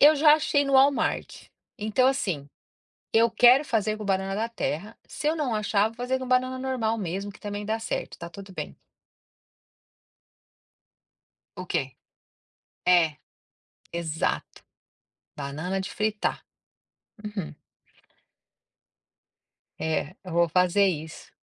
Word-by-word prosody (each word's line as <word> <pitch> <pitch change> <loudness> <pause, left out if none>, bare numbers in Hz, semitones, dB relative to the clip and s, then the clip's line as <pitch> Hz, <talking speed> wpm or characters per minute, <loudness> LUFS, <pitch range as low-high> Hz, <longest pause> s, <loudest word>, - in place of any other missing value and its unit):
Eu 300 +2 +8
já 300 +1 +7
achei 285 -2 +2
no 275 - 0
Wallmart, 275 +1 +2 0.3
então, 220 +5 +2
assim, 180 - 0 0.7
eu 230 +1 +5
quero 245 +5 +6
fazer 215 -3 0
com 215 - -6
banana 195 0 0
da 220 +3 0
terra, 215 -2 -4
se 300 - -4
eu 315 - +2
não 285 -7 -1
achar, 210 0 +2
vou 225 - -16
fazer 250 +2 -1
com 260 - -5
banana 255 +1 +2
normal 245 -4 -1
mesmo 195 +1 -3
que 210 - -17
também 205 0 -5
dá 220 +1 -1
certo, 220 - -4
tá 170 0 -7
tudo 195 0 -11
bem. - - -6 2.8
O 185 - -6
quê? 135 -6 -2 0.9
É, 165 -4 +4 0.8
exato, 165 -2 -2 0.7
banana 155 +7 -3
de 190 - -4
fritar, 215 -1 -1 0.8
uhum. 210 -7 -5 2.3
É, 160 +1 -1
eu 180 - -8
vou 170 0 +4
fazer 180 +4 +4
isso. 160 -4 -4
210 Hz, 125 wpm, -26 LUFS, 180-250 Hz, 2.8 s, Eu